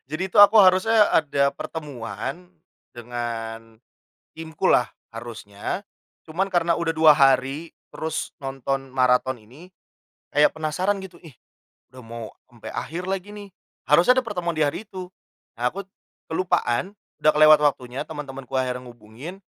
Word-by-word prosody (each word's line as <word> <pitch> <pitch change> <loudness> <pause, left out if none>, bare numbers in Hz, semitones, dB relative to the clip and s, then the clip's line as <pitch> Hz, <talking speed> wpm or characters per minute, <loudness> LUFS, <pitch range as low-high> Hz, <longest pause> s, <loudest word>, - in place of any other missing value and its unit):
Jadi 180 +5 -3
itu 210 - +6
aku 205 +2 +8
harusnya 205 +3 +5
ada 140 -2 +2
pertemuan 145 +3 -6 0.5
dengan 115 -1 -6 0.6
timku 160 -1 -8
lah 125 - +4 0.2
harusnya. 115 - -6 0.4
Cuman 180 +5 -2
karena 170 -2 +2
udah 170 -1 -1
2 160 -1 +8
hari, 140 +2 +2 0.2
terus 160 0 -4
nonton 135 0 -3
maraton 130 0 +2
ini 125 +11 -16 0.6
kayak 150 0 +3
penasaran 180 +6 -1
gitu, 190 -2 -10
"Ih, 160 - -12 0.6
udah 130 0 -12
mau 115 -1 -8 0.2
sampai 120 -2 -11
akhir 170 +4 -5
lagi 195 +1 -4
nih." 205 -1 -10 0.3
Harusnya 170 +12 +5
ada 260 - +3
pertemuan 180 -7 -3
di 155 - +2
hari 150 +9 -2
itu. 185 -2 -8 0.5
Nah 120 - +2
aku 195 +9 -4 0.5
kelupaan, 185 - 0 0.2
udah 155 - +5
kelewat 155 0 +7
waktunya, 130 -3 -1
teman-temanku 135 -4 -7
akhirnya 125 -1 -2
hubungin, 120 - -11
150 Hz, 135 wpm, -23 LUFS, 125-180 Hz, 0.6 s, aku